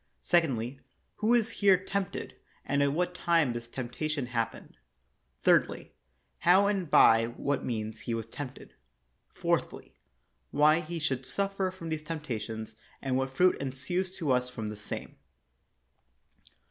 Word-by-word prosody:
Secondly, 135 -7 +1 0.4
who 225 +3 +3
is 230 -1 +2
here 195 -2 +7
tempted, 190 +1 -4 0.3
and 140 0 +1
at 140 0 +3
what 180 +4 0
time 165 -7 +2
this 120 0 -6
temptation 135 +4 -3
happened. 115 - -4 0.7
Thirdly, - - +3 0.5
how 185 +3 +5
and 195 -5 0
by 115 -4 +6
what 140 +4 -2
means 110 -2 -3
he 115 +1 -3
was 115 -1 -3
tempted. 130 +3 -8 0.6
Fourthly, - - -2 0.6
why 150 +2 +5
he 170 0 -5
should 135 -5 -1
suffer 195 +4 -1
these 160 -2 -3
temptations, 115 -8 -5 0.2
and 130 -2 -1
what 130 0 -2
fruit 180 0 +5
ensues 140 +8 -2
to 155 -6 0
us 125 0 +2
from 115 -4 -5
the 105 - -6
same. 105 0 -7
140 Hz, 135 wpm, -30 LUFS, 120-175 Hz, 0.7 s, here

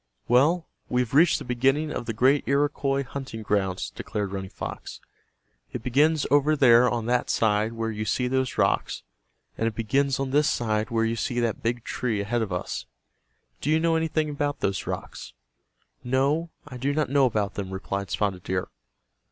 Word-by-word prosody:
"Well, 155 +8 +3 0.2
we 125 - +2
have 125 -1 -4
reached 155 +4 +5
the - - -8
beginning 135 +5 +1
of 120 - -4
the 115 - -1
great 130 +6 +3
Iroquois 140 -1 +1
hunting 130 -4 -7
grounds," 95 -3 -1
declared 100 -2 -4
Running 95 -1 -5
Fox. - - -7 0.7
"It - - -5
begins 150 +4 +2
over 145 +2 +4
there 125 -3 +6
on 120 -2 -2
that 125 +1 0
side 110 0 +1
where 115 0 -2
you 110 0 -4
see 125 +4 0
those 130 -1 -1
rocks, - - +1 0.6
and 115 - +1
it 110 - -3
begins 135 +4 +1
on 135 -1 -2
this 150 +2 +3
side 110 -1 0
where 115 -1 +1
you 115 +1 0
see 120 +1 -2
that 115 -2 -1
big 120 0 -1
tree 115 -5 -2
ahead 115 +4 -1
of 105 -3 -3
us. 90 - -4 0.7
Do 145 - -2
you 155 +1 +4
know 165 0 +2
anything 160 -1 0
about 145 0 -2
those 100 0 -1
rocks?" - - -6 0.7
"No, 140 +6 +1 0.2
I 125 -3 -8
do 135 +3 -1
not 150 -4 0
know 140 -2 +5
about 105 -4 -1
them," 100 -2 -5
replied 95 0 -4
Spotted 95 -2 -1
Deer. 90 0 -2
125 Hz, 185 wpm, -26 LUFS, 110-140 Hz, 0.7 s, there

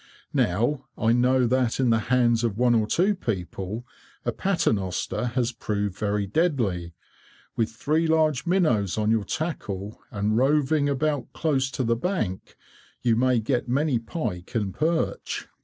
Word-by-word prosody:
Now, 120 +9 +1
I 110 +1 +2
know 125 +1 +3
that 125 0 +1
in 125 -3 +3
the 115 - +3
hands 120 -2 +3
of 110 -4 -1
one 120 0 +4
or 110 -2 +2
two 190 - +2
people, 105 - -4 0.4
a - - +1
paternoster 110 - 0
has 125 -2 +1
proved 105 -4 -2
very 105 -1 -1
deadly. 100 - 0 0.6
With 115 -1 +1
three 155 +8 0
large 155 -2 +2
minnows 135 - +2
on 110 0 +1
your 110 -3 +1
tackle, 105 - -4
and 105 +1 -1
roving 145 +3 +2
about 145 -1 -1
close 135 -5 0
to 130 - +1
the 115 0 +2
bank, 120 - -3 0.5
you 120 -2 +3
may 125 +1 +3
get 120 +2 -1
many 135 -1 +2
pike 115 - -5
and 100 -4 -1
perch." 160 +2 -1
120 Hz, 150 wpm, -25 LUFS, 105-145 Hz, 0.6 s, one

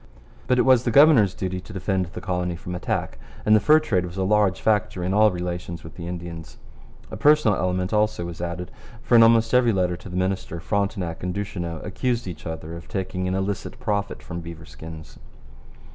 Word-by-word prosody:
But 125 - +3
it - - +4
was 130 -3 +5
the 125 - 0
governor's 125 - +6
duty 95 -1 -3
to 105 - -12
defend 95 -1 -1
the 85 - -8
colony 90 -1 -2
from 90 +1 -7
attack, 90 - -3 0.3
and 110 - +6
the - - +6
fur 155 +9 +5
trade 100 - 0
was 90 +1 -7
a 95 - 0
large 100 -1 +2
factor 105 -4 0
in 95 +2 -1
all 105 +1 +5
relations 90 -2 -5
with 80 - -10
the 85 -1 -8
Indians. 85 -2 -7 0.5
A - - -5
personal 145 -3 +4
element 90 +1 -1
was 105 0 +1
also 85 0 -6
added, 85 +1 -5 0.3
for 120 - +3
in 115 - +8
almost 115 0 +5
every 125 -2 +5
letter 90 -3 0
to 90 - -11
the 90 - -4
minister 95 -2 -2
Frontenac 100 -2 -2
and 90 +1 -3
Duchesneau 85 -5 -4
accused 120 +3 -1
each 90 -3 -7
other 80 0 -6
of 85 - -10
taking 90 -1 -3
an 90 - -1
illicit 95 +1 -3
profit 100 -2 -2
from 85 0 -6
beaver 85 -1 -9
skins. 80 +1 -11
95 Hz, 205 wpm, -24 LUFS, 85-105 Hz, 0.5 s, in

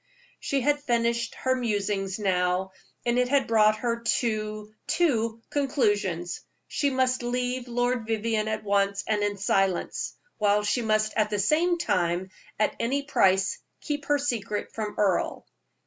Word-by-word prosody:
She 275 -1 -1
had 290 +3 +2
finished 235 -2 0
her 260 - 0
musing 205 -5 -1
now, 185 -2 0 0.3
and 240 +1 +2
it 250 0 +2
had 280 0 +3
brought 215 -1 +4
her 235 +1 -1
to 215 -2 -1
two 230 -9 +1
conclusions: 205 - 0 0.3
she 285 - 0
must 260 -1 +1
leave 250 +1 -2
Lord 245 -1 0
Vivianne 220 -1 0
at 215 0 -2
once, 200 -1 +1
and 210 -1 0
in 205 0 0
silence, 195 -1 0 0.2
while 210 0 +3
she 225 +4 +1
must 215 -1 +1
at 215 -1 +2
the 210 - -1
same 320 - +2
time, 180 - 0 0.3
at 215 - +1
any 270 +5 0
price, 190 -9 +2 0.2
keep 290 -2 -4
her 290 0 +3
secret 230 -7 -2
from 215 -2 -4
Earle. 195 -4 +1
220 Hz, 150 wpm, -27 LUFS, 205-250 Hz, 0.3 s, brought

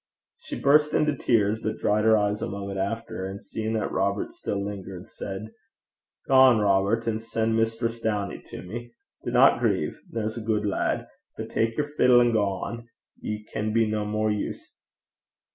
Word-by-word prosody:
She 310 -8 -7
burst 150 +2 +4
into 150 -1 +2
tears, 110 -4 +2
but 110 - -2
dried 105 +1 +1
her 110 0 +6
eyes 105 0 0
a - - -1
moment 100 -1 -5
after, 110 +1 -3
and 95 +1 -8
seeing 110 0 -3
that 110 - -1
Robert 100 +1 -1
still 100 -1 -3
lingered, 95 -2 -7
said, 100 +2 -6 0.8
'Gang, 130 -3 +7
Robert, 105 +2 +2
an' 110 -1 0
sen' 115 0 -1
Mistress 115 +1 -1
Downie 105 -3 -2
to - - -8
me. 120 +5 -8 0.3
Dinna - - +5
greit - - +1 0.2
there's 110 0 -3
a - - -4
gude 110 -1 0
lad; 100 - 0 0.3
but - - -6
tak 115 0 0
yer 150 - +1
fiddle 125 -4 +5
an' 120 -1 +3
gang. 110 +3 -1 0.3
Ye 105 0 -4
can 105 0 -1
be 115 0 +4
no 110 -1 -1
more 105 +1 0
use.' 105 -1 -5
110 Hz, 170 wpm, -26 LUFS, 100-115 Hz, 0.8 s, Gang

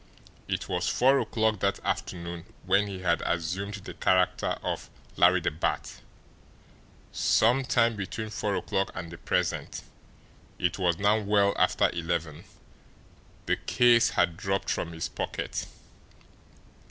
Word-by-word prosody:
It - - -2
was 90 -1 -1
four 135 +2 +4
o'clock 110 -3 0
that 100 0 0
afternoon 85 -1 -3 0.2
when 95 +3 +3
he 95 -2 -6
had 85 -2 +1
assumed 90 +5 -2
the 100 - -9
character 90 -1 +1
of - - -3 0.3
Larry - - +5
the - - 0
Bat 75 - -3 1.1
some 125 +5 +3
time 115 -3 +2
between 105 +2 -5
four 105 -2 -1
o'clock 95 0 -1
and 85 0 -6
the 85 - -10
present, - - -2 0.7
it 90 +2 -1
was 85 -3 +2
now 105 +3 +3
well 100 -1 +2
after - - +3
eleven, 85 -3 -3 1.0
the - - +1
case 120 -1 +4
had 85 -1 +1
dropped 95 0 -1
from 85 - -2
his 80 0 -4
pocket. - - -4
95 Hz, 130 wpm, -28 LUFS, 85-105 Hz, 1.1 s, Larry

